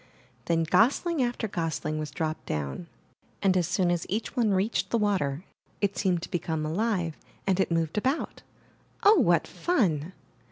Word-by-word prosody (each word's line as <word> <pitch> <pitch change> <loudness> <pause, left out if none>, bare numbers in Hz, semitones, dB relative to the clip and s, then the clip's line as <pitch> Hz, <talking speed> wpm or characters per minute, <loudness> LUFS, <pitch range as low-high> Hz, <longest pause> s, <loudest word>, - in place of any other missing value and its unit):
Then 165 -1 +2
gosling 275 - +3
after 240 -2 -1
gosling 160 -4 -2
was 155 -1 -4
dropped 155 -1 -4
down, 75 - -3 0.6
and 190 -2 +4
as 175 -3 +2
soon 185 -1 +1
as 175 -1 -1
each 215 +6 -3
one 235 -4 +2
reached 200 +3 +1
the 235 - +2
water, 185 -8 0 0.4
it 200 -1 0
seemed 180 -2 0
to - - -7
become 160 -2 -2
alive 175 -1 -1 0.3
and 195 -1 +1
it 190 - +2
moved 165 +3 +1
about. 265 +8 -2 0.6
Oh, 420 +2 +7
what - - +3
fun! 185 - 0
185 Hz, 160 wpm, -27 LUFS, 160-215 Hz, 0.6 s, Oh